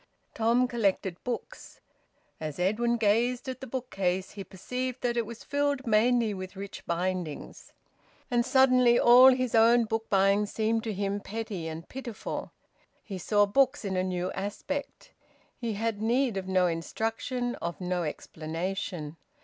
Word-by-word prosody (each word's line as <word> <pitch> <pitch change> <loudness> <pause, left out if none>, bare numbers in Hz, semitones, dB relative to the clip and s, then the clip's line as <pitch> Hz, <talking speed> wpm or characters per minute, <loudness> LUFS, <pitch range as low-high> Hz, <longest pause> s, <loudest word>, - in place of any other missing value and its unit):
Tom 235 +3 +2
collected 195 -6 -1
books. 255 - -6 0.6
As 155 -2 -5
Edwin 225 +6 +1
gazed 235 +4 +1
at 260 0 -5
the 265 - -6
bookcase 195 -7 -2
he 200 - -7
perceived 250 +7 -5
that 240 -1 0
it 235 -2 0
was 235 0 -9
filled 285 -1 0
mainly 230 0 +3
with 185 0 -7
rich 195 +1 -8
bindings. 175 -2 -3 0.6
And 240 -1 +3
suddenly 255 -2 +5
all 245 +2 +8
his 255 -2 0
own 230 +1 +5
book 225 0 -3
buying 200 +1 +3
seemed 220 +1 0
to 220 - -2
him 200 +1 -1
petty 205 -5 -5
and 160 +1 -7
pitiful. 250 -4 -6 0.5
He 195 -4 -6
saw 205 +3 +3
books 265 +4 +2
in 190 -1 -2
a 185 - +2
new 185 0 -2
aspect. 245 +9 -5 0.4
He 235 -3 -3
had 215 0 -2
need 240 +1 +1
of 190 -1 -4
no 185 -1 +3
instruction, 225 +8 -2
of 170 0 -4
no 180 -1 -1
explanation. 165 +1 -4
220 Hz, 150 wpm, -28 LUFS, 185-245 Hz, 0.6 s, all